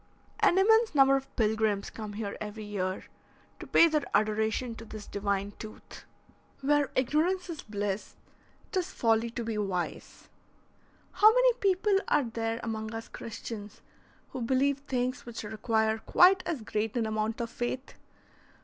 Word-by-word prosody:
An 410 -4 +4
immense 445 0 +4
number 270 -1 +6
of 270 0 -2
pilgrims 215 -3 +1
come 215 -2 -7
here 205 -1 -4
every 215 +1 -6
year 190 -3 -3 0.6
to - - -8
pay 335 - +6
their 305 -2 +1
adoration 220 +3 +1
to 225 - -10
this 215 -2 -9
divine 200 0 -2
tooth. 215 -1 -10 0.6
"Where 290 +1 +2
ignorance 340 +8 +1
is 320 - -6
bliss, 205 -1 -4 0.6
't 380 - +1
is 365 0 -3
folly 225 0 +1
to 235 +1 -5
be 225 -2 -3
wise." 185 -4 -4 0.8
How 430 +1 +7
many - - +4
people 390 -1 +2
are 290 - +3
there 225 -1 -3
among 220 -1 -4
us 225 0 -7
Christians 215 -2 -8 0.5
who 260 - -6
believe 265 +3 +1
things 255 -3 -3
which 235 -2 -6
require 220 +1 0
quite 365 - +5
as 305 -8 -2
great 215 +2 -2
an 230 - +1
amount 220 +1 -2
of 235 -1 -3
faith? 255 +2 -4
230 Hz, 150 wpm, -29 LUFS, 215-280 Hz, 0.8 s, How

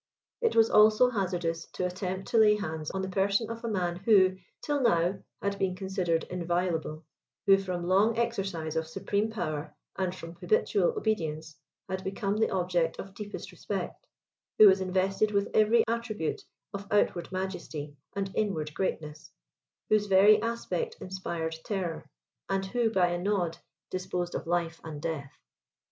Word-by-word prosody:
It 460 -2 +2
was 225 -1 +6
also 215 +4 +6
hazardous 175 -6 -2
to 180 - -2
attempt 185 +1 -3
to 230 - +3
lay 210 -1 +6
hands 160 -6 -4
on 190 0 -3
the - - -2
person 200 +4 +1
of 230 +1 -7
a - - -2
man 175 -4 -1
who, 190 -1 +5 0.3
till 290 -1 0
now, 180 -5 +2 0.2
had 200 0 -1
been 185 -1 0
considered 185 -3 -1
inviolable; 170 -3 -2 0.4
who 195 -1 +6
from 180 -3 -3
long 205 +5 +3
exercise 195 -9 -2
of 160 0 -1
supreme 200 +5 -1
power, 155 -8 -4 0.2
and 185 -1 -1
from 165 -2 -9
habitual 470 +1 +1
obedience, 160 - -2 0.3
had 190 0 -4
become 195 +1 -2
the 220 - +2
object 175 -3 0
of 195 0 -8
deepest 205 0 -7
respect; - - -5 0.5
who 215 - +10
was 190 0 +5
invested 190 +3 +1
with 200 -1 0
every 220 +2 +5
attribute 225 -7 -2 0.3
of 200 0 -6
outward 185 -4 +1
majesty 180 -6 -4 0.2
and 195 -1 -2
inward 160 -8 -1
greatness; 155 -5 -4 0.6
whose 210 -1 +3
very 205 +2 +6
aspect 235 - -2
inspired 170 -3 -4
terror, 185 -6 -3 0.4
and 195 0 0
who 230 +3 +1
by 185 -5 +3
a 175 0 -1
nod 175 -3 -1 0.3
disposed 180 -1 -3
of - - -4
life 170 -1 -1
and 155 -2 -7
death! 150 -4 -4
190 Hz, 155 wpm, -29 LUFS, 170-210 Hz, 0.6 s, who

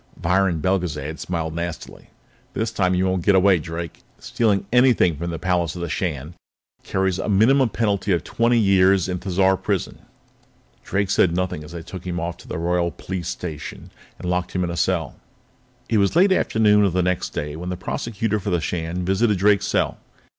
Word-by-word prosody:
Viron 90 -1 +1
Belgezad 80 -5 -1
smiled 80 -3 -3
nastily. 85 -1 -6 0.5
"This 110 0 -1
time 90 -4 +1
you 90 +1 +1
won't 95 -2 0
get 100 - +4
away, 95 -1 +5
Drake! 85 +1 -6 0.2
Stealing 100 -4 0
anything 125 -9 +4
from 85 +4 -4
the 85 - -4
palace 90 -1 0
of 90 - -5
the 85 - -3
Shan 75 -2 -3 0.5
carries 95 -1 -1
a - - -3
minimum 120 +6 +4
penalty 100 -3 0
of 85 -4 +1
twenty 115 +1 +1
years 95 -3 +4
in 90 -1 -3
Thizar 95 0 +2
Prison." - - -2 0.8
Drake 100 0 -1
said 85 -3 +3
nothing 90 -4 -2
as 75 +3 -11
they 85 -1 -7
took 90 +1 -9
him 90 0 -2
off 85 +1 -3
to - - -15
the - - -4
Royal 85 +1 0
Police 90 -1 -6
Station 80 -5 -6 0.3
and - - -7
locked 90 0 -1
him 90 - 0
in 85 - -2
a - - -4
cell. - - -1 0.7
It 110 - +2
was 100 +6 +1
late 190 +3 +5
afternoon 105 - +3
of 95 -4 +1
the 90 0 +1
next 90 -1 -1
day 75 0 -4
when 90 +3 -6
the 90 - -3
Prosecutor 110 +2 -2
for 100 - -4
the 90 -2 +1
Shan 85 +2 -3
visited 100 +3 +2
Drake's 100 +2 +3
cell. - - 0
90 Hz, 190 wpm, -22 LUFS, 85-100 Hz, 0.8 s, away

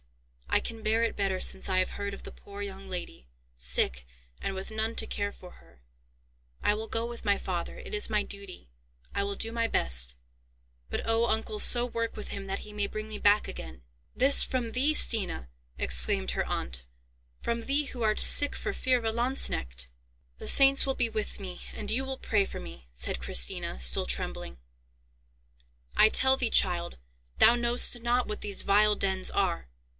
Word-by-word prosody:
"I - - +2
can 225 -1 -7
bear 225 +2 +1
it 230 - -1
better 195 -2 -1
since 190 - -1
I 185 - 0
have 185 - 0
heard 200 0 -5
of - - -10
the - - -10
poor 200 0 -11
young 195 -1 -8
lady, 175 - -7 0.3
sick - - +1 0.4
and 195 - -3
with 190 +2 -7
none 220 +1 -3
to - - +1
care 205 0 -3
for 180 -2 -14
her. 60 - -22 0.8
I - - +2
will 220 +1 -6
go 225 +1 -3
with 235 0 -8
my 200 -2 +1
father; 175 -2 -5
it - - -10
is 210 +1 +2
my 210 -1 +1
duty. 200 - -8 0.5
I 200 - 0
will 200 0 -4
do 225 +3 -2
my 230 0 -1
best; - - +2 0.7
but - - -3
oh! 225 +1 +1
uncle, 220 -2 -2
so 240 +2 +7
work 230 -1 -4
with 210 - -7
him 195 -1 -7
that 195 - -3
he 210 - -10
may 205 -1 -2
bring 215 +1 -7
me 215 -1 -7
back 205 +1 +3
again." 65 -1 -9 0.3
"This 270 +3 +6
from 245 -3 -3
thee, 275 +5 +4
Stina!" 195 - +3 0.3
exclaimed 60 0 +2
her - - -2
aunt; 60 -1 -3 0.6
"from 235 0 -3
thee 280 +5 +2
who 250 -3 -8
art 215 -1 +1
sick 290 - +6
for - - -4
fear 255 -1 0
of 235 - -7
a 225 - 0
lanzknecht!" 145 - -2 0.5
"The - - -8
saints 275 0 +6
will 270 -1 -2
be 240 -2 +1
with 215 -2 -5
me, 185 -2 -8
and 205 - -6
you 245 +5 0
will 265 0 -6
pray 210 -5 0
for - - -8
me," 65 -2 -12
said - - -3
Christina, 60 -1 -1
still 60 0 +3
trembling. 65 - -2 1.4
"I 215 - +6
tell 265 +3 +5
thee, 245 -3 0
child, 175 - +1 0.4
thou 235 - +6
knowst 240 0 +3
not 240 +1 0
what 210 - -6
these 200 -2 +1
vile 210 +1 +3
dens 190 -2 +1
are. 185 - -1
210 Hz, 190 wpm, -28 LUFS, 180-230 Hz, 1.4 s, so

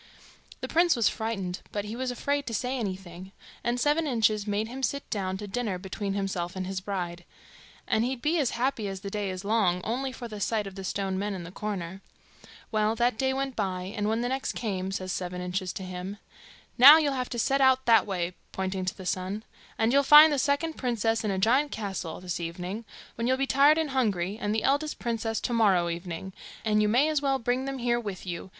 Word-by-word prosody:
The - - -3
prince 340 +1 +3
was 235 -3 +3
frightened, 195 -5 -2
but 205 -1 -3
he 215 +2 -5
was 255 +1 -2
afraid 285 +3 -1
to 230 - -2
say 250 +4 -1
anything, 190 -4 -6 0.3
and 240 +1 0
Seven 300 +4 +2
Inches 215 -5 +1
made 210 +1 0
him 255 +3 -7
sit 280 +1 -2
down 190 -2 -2
to 205 +1 -7
dinner 215 -3 -2
between 195 +2 -4
himself 185 -3 -2
and 185 0 -3
his 190 0 -4
bride; 175 -3 -4 0.6
and 220 - +2
he'd 255 +1 -2
be 315 +6 +1
as 275 -5 +2
happy 240 -4 0
as 195 -1 -5
the 200 -1 -6
day 205 -1 -2
is 185 +1 -6
long, 200 -5 +2
only 260 +4 -2
for 250 -1 -7
the 215 -2 -8
sight 215 +1 0
of 195 - -7
the 195 0 -7
stone 190 0 -2
men 205 0 -2
in 180 - -6
the 170 - -9
corner. 195 -2 -5 0.7
Well, 215 0 +1
that 240 0 +2
day 265 0 +2
went 270 -1 -2
by, 185 0 -3
and 210 0 0
when 225 +1 0
the 245 - -1
next 265 +1 -2
came, 190 -4 -3
says 185 -1 -3
Seven 180 0 -3
Inches 180 +1 -2
to 190 - -6
him, 185 +2 -6 0.6
'Now, 285 +5 +11
you'll 295 -3 +1
have 255 -1 -2
to 240 - -4
set 275 +4 +2
out 260 0 +4
that 230 -2 +5
way,' 180 -2 -2 0.2
pointing 190 0 -3
to 185 - -3
the 190 - -9
sun, 185 +4 -2 0.3
'and 225 +2 +2
you'll 280 - +6
find 300 +2 +9
the 285 - +1
second 295 +4 0
princess 225 -3 0
in 215 - -1
a 195 - -1
giant's 255 +9 +2
castle 195 -6 -4
this 180 -1 -4
evening, 180 +6 -5 0.3
when 230 +1 -2
you'll 260 +1 +2
be 275 - +1
tired 280 +3 +5
and 315 -3 0
hungry, 205 -8 0
and 210 +1 0
the 220 - 0
eldest 290 +3 +1
princess 225 -1 -2
to 245 - -2
morrow 195 -7 +3
evening; 170 +2 -5 0.3
and 215 -1 +3
you 210 - +3
may 255 +7 +4
as 305 -2 +1
well 275 -1 +1
bring 250 +1 -1
them 275 0 -3
here 240 -1 +1
with 200 -5 -6
you. 175 +1 -5
215 Hz, 225 wpm, -28 LUFS, 190-255 Hz, 0.7 s, Now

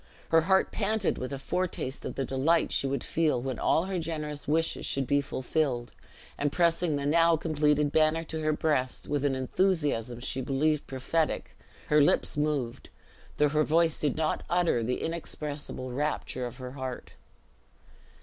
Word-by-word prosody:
Her 165 0 +5
heart 190 +3 +2
panted 210 -1 0
with 130 - -4
a 140 - -3
foretaste 155 -2 -3
of - - -4
the 135 - -1
delight 145 +6 +2
she 140 - +1
would 140 +1 -2
feel 155 -6 +1
when 130 -1 -4
all 165 - +2
her 190 -1 -2
generous 150 -3 -5
wishes 160 +2 +1
should 135 -1 -1
be 140 +2 +2
fulfilled; 130 -2 -2 0.5
and 145 0 +1
pressing 170 -1 +2
the 140 0 -2
now 165 +2 +4
completed 150 -2 +1
banner 155 +1 +3
to 160 -1 -5
her 155 0 +1
breast, 150 -4 -1
with 145 -1 -1
an 135 -2 +2
enthusiasm 130 - 0
she 130 +1 -3
believed 145 +3 0
prophetic, 150 +5 -1 0.3
her 150 0 +5
lips 145 - +3
moved, 145 -5 -2 0.5
though 150 0 +4
her 155 +1 +2
voice 165 +1 +2
did 145 -4 0
not 155 -1 0
utter 175 -8 +2
the 125 +3 -2
inexpressible 150 -5 -5
rapture 130 -2 -2
of 120 - -9
her 125 -1 -7
heart. 130 -2 -6
150 Hz, 165 wpm, -29 LUFS, 135-160 Hz, 0.5 s, Her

